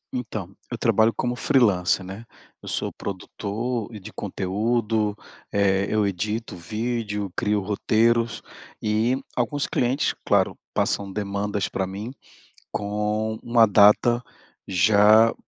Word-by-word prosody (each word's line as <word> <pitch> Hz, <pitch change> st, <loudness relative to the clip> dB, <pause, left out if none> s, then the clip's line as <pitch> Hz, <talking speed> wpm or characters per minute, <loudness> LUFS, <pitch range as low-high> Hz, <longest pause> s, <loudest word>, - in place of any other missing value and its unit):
Então, 110 Hz, -6 st, -5 dB, 0.2 s
eu 120 Hz, -, -3 dB
trabalho 115 Hz, -1 st, +3 dB
como 125 Hz, -1 st, -1 dB
freelancer, 100 Hz, -9 st, +2 dB
né. 100 Hz, +5 st, -8 dB, 0.4 s
Eu -, -, -12 dB
sou -, -, -2 dB
produtor 110 Hz, +4 st, -4 dB
de 105 Hz, +2 st, -11 dB
conteúdo, 105 Hz, +2 st, -1 dB, 0.3 s
eh, 100 Hz, -1 st, +2 dB
eu 110 Hz, -1 st, +2 dB
edito 105 Hz, +4 st, -3 dB
vídeo, 105 Hz, +1 st, -3 dB
crio 105 Hz, -2 st, +1 dB
roteiros, 115 Hz, +3 st, +1 dB, 0.4 s
e 110 Hz, +4 st, +1 dB, 0.2 s
alguns 135 Hz, +4 st, 0 dB
clientes, 130 Hz, +3 st, +1 dB
claro, -, -, +2 dB, 0.2 s
passam 100 Hz, -1 st, 0 dB
demandas 100 Hz, 0 st, -2 dB
para 95 Hz, -1 st, -2 dB
mim, 100 Hz, +5 st, -6 dB, 0.6 s
com 105 Hz, +1 st, -2 dB
uma 115 Hz, -1 st, +5 dB
data 105 Hz, +4 st, +5 dB, 0.5 s
já 105 Hz, +4 st, +5 dB
105 Hz, 110 wpm, -24 LUFS, 100-115 Hz, 0.6 s, uma